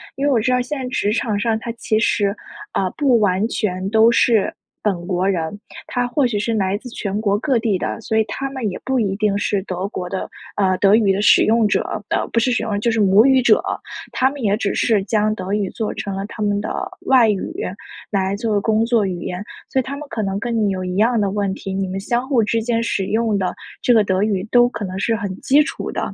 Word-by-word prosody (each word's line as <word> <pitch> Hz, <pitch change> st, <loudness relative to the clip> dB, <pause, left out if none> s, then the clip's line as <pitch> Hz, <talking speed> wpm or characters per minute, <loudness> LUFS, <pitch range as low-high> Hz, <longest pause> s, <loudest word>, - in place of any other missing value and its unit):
因 275 Hz, -, -2 dB
为 290 Hz, -, +3 dB
我 245 Hz, -, +3 dB
知 230 Hz, +4 st, +1 dB
道 250 Hz, -, +3 dB
现 275 Hz, +3 st, -4 dB
在 255 Hz, -, -4 dB
职 210 Hz, -4 st, 0 dB
场 215 Hz, -2 st, -1 dB
上， 220 Hz, +1 st, +1 dB
它 235 Hz, -, -5 dB
其 220 Hz, -2 st, -1 dB
实， 205 Hz, -3 st, +1 dB, 0.4 s
呃， 190 Hz, -, 0 dB
不 265 Hz, -6 st, +3 dB
完 200 Hz, 0 st, +2 dB
全 190 Hz, -5 st, -2 dB
都 220 Hz, +2 st, +5 dB
是 230 Hz, -3 st, +3 dB, 0.3 s
本 180 Hz, -5 st, -1 dB
国 185 Hz, 0 st, 0 dB
人， 180 Hz, +1 st, -2 dB, 0.3 s
它 245 Hz, 0 st, -1 dB
或 260 Hz, +3 st, +1 dB
许 225 Hz, -3 st, -2 dB
是 225 Hz, +3 st, -1 dB
来 195 Hz, -2 st, 0 dB
自 250 Hz, -, -11 dB
全 205 Hz, -3 st, -3 dB
国 205 Hz, -2 st, +1 dB
各 265 Hz, +1 st, +1 dB
地 220 Hz, -3 st, 0 dB
的， -, -, -3 dB
所 220 Hz, 0 st, -1 dB
以 -, -, +4 dB
他 275 Hz, +5 st, -4 dB
们 260 Hz, -5 st, -3 dB
也 180 Hz, -, -6 dB
不 265 Hz, -1 st, +1 dB
一 200 Hz, -4 st, 0 dB
定 210 Hz, -1 st, +1 dB
是 205 Hz, -1 st, 0 dB
德 185 Hz, 0 st, -3 dB
国 180 Hz, -3 st, -5 dB
的 190 Hz, -, -4 dB, 0.3 s
呃， 190 Hz, -2 st, +2 dB
德 195 Hz, +1 st, +4 dB
语 215 Hz, -3 st, +3 dB
的 195 Hz, +1 st, 0 dB
使 -, -, +6 dB
用 225 Hz, 0 st, +3 dB
者 -, -, +1 dB, 0.3 s
的， -, -, -1 dB
不 230 Hz, -, +2 dB
是 250 Hz, +2 st, +1 dB
使 245 Hz, -, +1 dB
用， 205 Hz, -2 st, -1 dB
就 235 Hz, +3 st, +1 dB
是 225 Hz, -, 0 dB
母 200 Hz, +2 st, +5 dB
语 265 Hz, -1 st, +5 dB
者。 245 Hz, -, +4 dB, 0.5 s
他 260 Hz, 0 st, +2 dB
们 285 Hz, 0 st, -8 dB
也 205 Hz, -1 st, +2 dB
只 200 Hz, -2 st, -2 dB
是 215 Hz, -4 st, +2 dB
将 215 Hz, 0 st, +1 dB
德 195 Hz, -3 st, -5 dB
语 205 Hz, -2 st, 0 dB
作 220 Hz, -2 st, -3 dB
成 200 Hz, -1 st, -4 dB
了 195 Hz, -, -3 dB
他 215 Hz, 0 st, -5 dB
们 205 Hz, 0 st, 0 dB
的 -, -, -4 dB, 0.4 s
外 255 Hz, -4 st, +6 dB
语， 205 Hz, +6 st, -2 dB, 0.6 s
来 195 Hz, -1 st, 0 dB
作 220 Hz, +1 st, -2 dB
为 205 Hz, -, +3 dB
工 220 Hz, +1 st, +2 dB
作 230 Hz, -2 st, +2 dB
语 180 Hz, -2 st, -4 dB
言。 180 Hz, +2 st, -4 dB, 0.3 s
所 265 Hz, -, +1 dB
以 -, -, +1 dB
他 280 Hz, +3 st, -6 dB
们 300 Hz, 0 st, -8 dB
可 220 Hz, -, -3 dB
能 195 Hz, -1 st, -2 dB
跟 235 Hz, +2 st, -2 dB
你 215 Hz, -2 st, +2 dB
有 185 Hz, -1 st, -3 dB
一 180 Hz, 0 st, -3 dB
样 230 Hz, +2 st, +3 dB
的 200 Hz, -2 st, 0 dB
问 200 Hz, -1 st, -1 dB
题， 195 Hz, -, -6 dB
你 195 Hz, 0 st, -1 dB
们 190 Hz, +1 st, -4 dB
相 240 Hz, +5 st, -1 dB
互 245 Hz, -6 st, +3 dB
之 225 Hz, +2 st, 0 dB
间 230 Hz, 0 st, 0 dB
使 195 Hz, -4 st, -1 dB
用 220 Hz, +2 st, 0 dB
的 185 Hz, -2 st, -2 dB, 0.3 s
这 -, -, +2 dB
个 225 Hz, -3 st, +5 dB
德 190 Hz, -1 st, 0 dB
语 205 Hz, -2 st, 0 dB
都 245 Hz, 0 st, +5 dB
可 215 Hz, -, -5 dB
能 185 Hz, 0 st, -5 dB
是 225 Hz, +3 st, +1 dB
很 200 Hz, -4 st, -4 dB
基 290 Hz, +3 st, +4 dB
础 300 Hz, -, -5 dB
的。 -, -, -3 dB
215 Hz, 275 characters per minute, -20 LUFS, 195-235 Hz, 0.6 s, 使